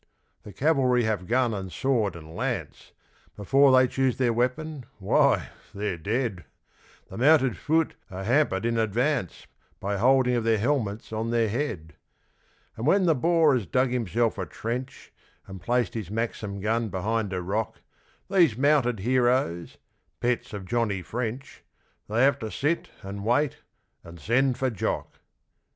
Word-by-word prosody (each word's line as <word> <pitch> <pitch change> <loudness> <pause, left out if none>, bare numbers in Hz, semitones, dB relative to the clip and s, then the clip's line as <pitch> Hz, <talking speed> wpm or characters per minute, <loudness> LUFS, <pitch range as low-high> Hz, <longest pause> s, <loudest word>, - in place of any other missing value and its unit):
The 105 - -11
Cavalry 130 - +2
have 105 -5 -1
gun 125 -1 +2
and 95 -3 -5
sword 115 -8 0
and 80 -1 -11
lance, - - -4 0.4
Before 135 +7 +4
they 130 0 +6
choose 130 0 0
their 125 -3 +2
weapon, 125 +3 -2
why, 95 -2 +2 0.3
they're 100 -3 -3
dead. 105 0 -2 0.7
The - - -7
Mounted 135 -3 +4
Fut 160 0 0 0.2
are 95 +1 -6
hampered 115 -3 +1
in 115 -1 +1
advance 120 - -1 0.3
By 100 +1 -2
holding 125 +3 +3
of 120 -2 0
their 115 -1 +2
helmets 110 -3 -1
on 110 +1 -2
their 115 -2 +1
head. 105 - -3 0.8
And 115 +5 -3
when 190 +3 +4
the 165 - +4
Boer 160 +1 +3
has 115 -7 -1
dug 130 0 +1
himself 115 -2 0
a 90 - -3
trench 125 +9 -6 0.3
And 95 -2 -10
placed 120 +4 0
his 110 -6 -5
Maxim 105 -2 -3
gun 110 +2 0
behind 105 +3 -2
a 95 - -2
rock, 105 +4 -3 0.5
These 170 - +3
mounted 130 -6 +2
heroes 120 -7 +1 0.4
pets 125 0 -1
of 100 -3 -6
Johnny 105 -4 -1
French 120 +5 -5 0.5
They 115 +4 +2
have 140 +1 +3
to 110 -3 -5
sit 165 +8 -1
and 100 +1 -6
wait 125 +6 +1 0.5
and 85 0 -12
send 125 - +1
for 130 0 0
Jock! 105 - -3
120 Hz, 150 wpm, -26 LUFS, 105-130 Hz, 0.8 s, they